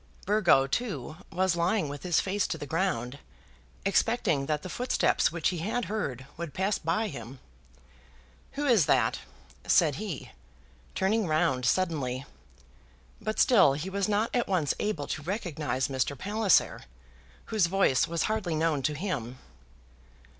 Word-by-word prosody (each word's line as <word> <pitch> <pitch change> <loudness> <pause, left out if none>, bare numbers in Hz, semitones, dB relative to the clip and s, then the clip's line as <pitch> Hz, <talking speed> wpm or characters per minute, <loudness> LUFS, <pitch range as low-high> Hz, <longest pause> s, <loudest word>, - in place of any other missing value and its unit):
Burgo, 195 -9 +4
too, 155 - -3
was 185 0 +1
lying 175 +1 +1
with 145 0 -7
his 175 -3 +2
face 200 +1 0
to 160 - -3
the 145 - -6
ground, 145 -6 -2 0.7
expecting 195 - +1
that 150 -1 -1
the - - -5
footsteps 250 -5 +1
which 165 -2 0
he 175 -2 -3
had 220 +7 -2
heard 165 - -3
would 170 -3 -6
pass 190 +2 0
by 215 +8 0
him. 120 - -8 1.2
"Who 290 +1 -2
is 230 - +4
that?" 120 -4 +2 0.5
said 155 -5 +4
he, 200 -9 -6 0.6
turning 210 +1 +1
round 155 -6 +1
suddenly; 140 -6 0 1.0
but 215 - -3
still 190 - +5
he 155 +7 -4
was 200 +1 -1
not 210 +2 +1
at 245 - +1
once 170 -8 +1
able 190 -9 -2
to - - -4
recognize 155 - -2
Mr. 135 +1 -1
Palliser, 205 - +2 0.7
whose 205 -6 +3
voice 185 -8 +2
was 170 0 -1
hardly 215 -7 -1
known 155 -2 +1
to 150 +2 -1
him. 130 - -4
170 Hz, 145 wpm, -28 LUFS, 145-205 Hz, 1.2 s, still